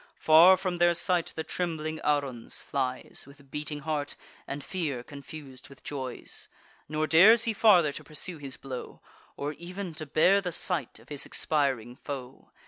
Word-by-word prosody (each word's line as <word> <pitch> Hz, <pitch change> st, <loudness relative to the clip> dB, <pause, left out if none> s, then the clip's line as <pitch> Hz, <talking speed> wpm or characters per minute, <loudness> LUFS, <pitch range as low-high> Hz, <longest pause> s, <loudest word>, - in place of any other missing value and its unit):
Far 170 Hz, +4 st, +7 dB
from 180 Hz, -2 st, -3 dB
their 175 Hz, 0 st, +4 dB
sight 175 Hz, -1 st, +2 dB
the 160 Hz, -, -3 dB
trembling 160 Hz, -2 st, -3 dB
Aruns 140 Hz, -5 st, -1 dB
flies, 130 Hz, -2 st, -3 dB
With 140 Hz, -1 st, -17 dB
beating 150 Hz, 0 st, -4 dB
heart, 150 Hz, -1 st, -2 dB, 0.3 s
and 140 Hz, 0 st, -5 dB
fear 150 Hz, -10 st, -3 dB
confus'd 140 Hz, -2 st, -10 dB
with 140 Hz, -2 st, -16 dB
joys; 130 Hz, -4 st, -7 dB, 0.4 s
Nor 155 Hz, 0 st, 0 dB
dares 210 Hz, +9 st, +7 dB
he 230 Hz, -2 st, 0 dB
farther 185 Hz, -8 st, +5 dB
to -, -, -7 dB
pursue 160 Hz, +2 st, -5 dB
his 135 Hz, -2 st, -6 dB
blow, 130 Hz, -2 st, -7 dB, 0.4 s
Or 145 Hz, +1 st, -3 dB
ev'n 180 Hz, +1 st, -6 dB
to 155 Hz, -, -5 dB
bear 180 Hz, +7 st, +4 dB
the 180 Hz, -2 st, -3 dB
sight 165 Hz, -7 st, -1 dB
of 110 Hz, +3 st, -18 dB
his 145 Hz, -2 st, -3 dB
expiring 130 Hz, -6 st, 0 dB
foe. 135 Hz, -2 st, -8 dB
150 Hz, 160 wpm, -28 LUFS, 140-175 Hz, 0.4 s, Far